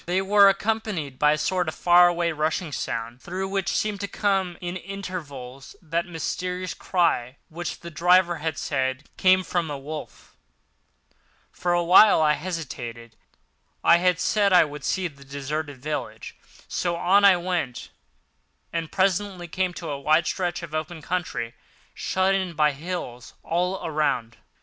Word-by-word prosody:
They 180 +2 +1
were 200 0 +6
accompanied 195 -9 -2
by 150 0 +5
a - - -1
sort 180 +3 0
of 155 - -3
far 175 0 +6
away 170 -1 0
rushing 155 +2 -1
sound, 115 -2 -4
through 185 +2 -4
which 195 -1 -1
seemed 210 -1 -1
to 200 - -2
come 195 -4 0
at - - -17
intervals 175 -8 -7
that 170 +1 -2
mysterious 180 +2 -3
cry 140 -8 0
which 170 +1 -6
the 170 - -8
driver 175 +2 +3
had 155 -1 -3
said 130 0 -2
came 185 0 +4
from 175 -3 -2
a 145 - -4
wolf. 150 +2 -9 1.2
For 175 - -2
a 175 0 +2
while 185 +4 +7
I 155 -1 +4
hesitated. 120 -9 -6 0.7
I 170 - +7
had 180 0 +2
said 205 +1 +2
I 180 -3 +7
would 150 0 -9
see 190 -1 0
the 140 -4 -15
deserted 140 +1 -5
village, 150 +4 -5 0.3
so 175 -1 -1
on 190 +4 +3
I 195 -2 +7
went, 175 -8 -3 0.8
and 165 -2 -3
presently 190 -1 0
came 185 +1 -2
on - - -4
a 140 -1 -3
wide 155 +4 +3
stretch 175 0 -2
of 160 -2 -8
open 155 0 -4
country, 140 -11 -3 0.4
shut 190 +1 +1
in 190 -3 -1
by 150 -1 +3
hills 140 -5 -6
all 180 +3 -1
around. 150 -7 -1
170 Hz, 155 wpm, -25 LUFS, 150-185 Hz, 1.2 s, while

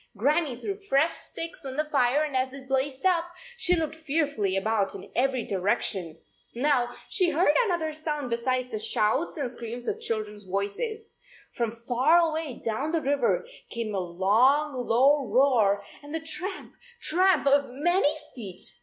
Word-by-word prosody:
Gran 300 +10 +2
nie 265 -5 -5
threw 395 - -4
fresh 320 -5 +2
sticks 330 -1 -3
on 265 0 -6
the 305 - +1
fire, 280 -1 +2
and 295 -3 -4
as 260 0 0
it 270 -1 -11
blazed 270 +2 -1
up, 350 -3 +3 0.3
she 360 -6 +2
looked 320 -2 -2
fearfully 285 - -1
about 205 0 0
in - - -10
every 260 -1 +1
direction. 185 -3 0 0.4
Now 245 -2 +1
she 370 -6 +2
heard 315 -1 +3
another 335 -6 -1
sound 300 -4 -3
besides 255 +2 -1
the 215 - -3
shouts 220 +11 0
and 270 -5 -2
screams 240 0 -7
of - - -2
children 215 -2 -3
s - - -7
voices. 200 - -3 0.5
From 235 -2 -2
far 245 +7 +3
away 320 -5 0
down 225 +7 -1
the 330 -1 0
river 285 - +1 0.2
came 230 -2 -4
a 195 - 0
long 220 - +2
low 260 +3 +3
roar 215 -4 +3 0.2
and 290 +2 -7
the - - -1
tramp, 360 +4 -3 0.3
tramp 365 -1 +3
of 280 0 +3
many 310 +3 +1 0.2
feet. 195 -7 -7
270 Hz, 165 wpm, -27 LUFS, 230-315 Hz, 0.5 s, up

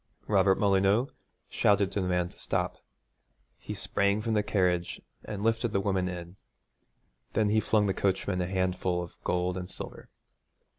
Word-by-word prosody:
Robert 95 -2 +4
Molyneux 100 +5 +3 0.4
shouted 100 -1 +2
to 100 - -1
the 90 - -1
man 90 -1 +1
to - - -20
stop. - - -1 0.8
He - - -6
sprang 100 +1 +1
from 110 +1 -1
the 105 - +3
carriage 90 -4 0 0.3
and 105 -2 -5
lifted 115 0 +1
the 100 - +2
woman 95 -2 0
in. 90 +1 -7 1.0
Then 110 -2 +2
he 110 +1 +3
flung 105 0 +2
the 95 - +1
coachman 95 -1 0
a 90 - -1
handful 90 -1 0
of 85 - -10
gold 90 +1 0
and 90 0 -7
silver. - - -8
95 Hz, 160 wpm, -29 LUFS, 90-105 Hz, 1.0 s, Robert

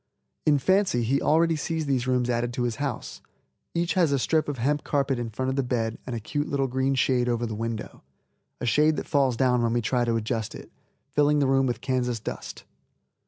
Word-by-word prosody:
In 150 -1 +5
fancy 185 - +2
he 135 +5 +1
already 165 +1 +3
sees 160 +1 -2
these 130 -3 0
rooms 125 -1 +1
added 120 0 -1
to 120 - -1
his 120 -2 -1
house. 140 -4 -4 0.5
Each 170 0 +1
has 175 -6 +3
a 140 - +3
strip 155 +4 +1
of 145 - -3
hemp 145 +5 0
carpet 140 -3 0
in 120 -1 -3
front 130 +4 -2
of 130 - -1
the 135 - +2
bed 115 -3 -2
and 125 - -3
a - - -3
cute 145 +7 -3
little 140 -1 +1
green 130 +2 0
shade 125 -1 +2
over 120 0 0
the 110 - -4
window, 115 0 -5 0.6
a - - -3
shade 150 +6 +3
that - - -4
falls 135 -5 +2
down 125 -2 +3
when 115 -1 +1
we 120 - +1
try 125 +3 +1
to 115 -1 +1
adjust 110 -1 -2
it, - - -11 0.4
filling 150 0 +3
the 145 - +3
room 135 0 +3
with 120 - -2
Kansas 125 -3 -1
dust. - - -7
130 Hz, 220 wpm, -26 LUFS, 120-145 Hz, 0.6 s, In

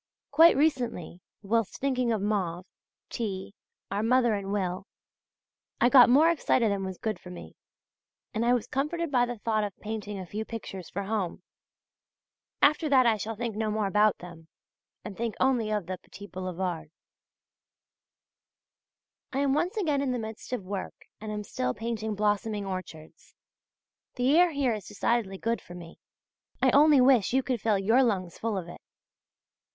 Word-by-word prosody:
Quite 325 +3 +7
recently, 245 - -1 0.2
whilst 225 +1 0
thinking 255 -3 0
of 215 -3 -1
Mauve, 185 -4 -1 0.5
T., 195 -5 -4 0.4
our 200 +1 -1
mother 240 0 +3
and 200 -1 -3
Will, 190 -1 -2 0.9
I 240 - +4
got 250 -3 +8
more 305 +7 +6
excited 250 -8 +1
than 200 -1 -2
was 190 -1 -5
good 220 -1 -3
for 180 - -12
me, 180 - -10 0.8
and 225 0 -1
I 240 - +3
was 240 - -2
comforted 300 +4 -2
by 245 -2 +3
the 245 -1 -5
thought 215 0 0
of 205 -2 -5
painting 210 -1 -5
a 190 - -6
few 210 +5 -4
pictures 195 -5 -8
for 200 - -4
home. 195 -3 -3 1.2
After 305 +2 +4
that 260 -3 +5
I 225 -2 +3
shall 220 +2 -4
think 230 -1 -4
no 215 0 -1
more 215 0 0
about 210 +1 +3
them, 170 -2 -12 0.6
and 205 - -7
think 230 0 -3
only 250 -5 +2
of 210 -4 -1
the 185 +1 -5
petit 200 - -12
boulevard. 180 -4 -4 2.4
I 265 - -4
am 275 -1 +2
once 350 +8 0
again 300 -9 +1
in 265 -2 0
the - - -1
midst 220 0 -7
of 250 -6 -3
work 195 +1 -5 0.2
and 215 0 -6
am 210 0 -4
still 125 -10 -3
painting 220 -1 -3
blossoming 210 0 0
orchards. 185 -5 -8 0.8
The 255 +4 +2
air 355 +1 +6
here 280 -6 0
is 210 -3 -6
decidedly 205 -1 -1
good 230 +4 -2
for 175 - -12
me, 170 -1 -11 0.6
I - - +4
only 295 -1 +6
wish 250 -5 +4
you 265 0 +3
could 245 -5 -2
fill 215 -3 +2
your 225 +7 +3
lungs 190 -8 -1
full 225 -2 -2
of 175 -2 -5
it. 175 - -11
215 Hz, 170 wpm, -28 LUFS, 195-250 Hz, 2.4 s, got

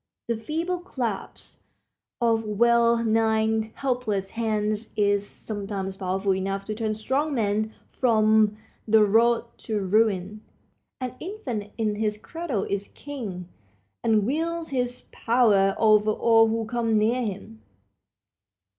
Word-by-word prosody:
The 235 - 0
feeble 325 +11 -3
clasp 245 - -5 0.6
of 230 -2 +2
well 235 +2 +3
nigh 220 0 +1
helpless 235 -8 -2
hands 215 -1 -1
is 205 -1 +2
sometimes 195 -2 -5
powerful 190 +1 0
enough 195 +1 -3
to 215 - -3
turn 215 0 -2
strong 275 +7 -1
men 215 -1 0 0.2
from 215 -3 +3 0.3
the 220 0 +6
road 230 +3 +3
to 215 -2 -2
ruin. 205 0 +1 0.6
An 255 -2 -4
infant 250 - -5
in 215 -2 -1
his 210 -1 -1
cradle 280 - -4
is 200 0 -3
king, 215 -12 -7 0.6
and 215 -3 +3
wields 330 +5 -2
his 250 -2 -2
power 210 -5 +3
over 215 -1 +4
all 225 +1 +4
who 225 0 -1
come 230 -1 0
near 230 +4 +2
him. 190 - -6
220 Hz, 120 wpm, -25 LUFS, 205-235 Hz, 0.6 s, the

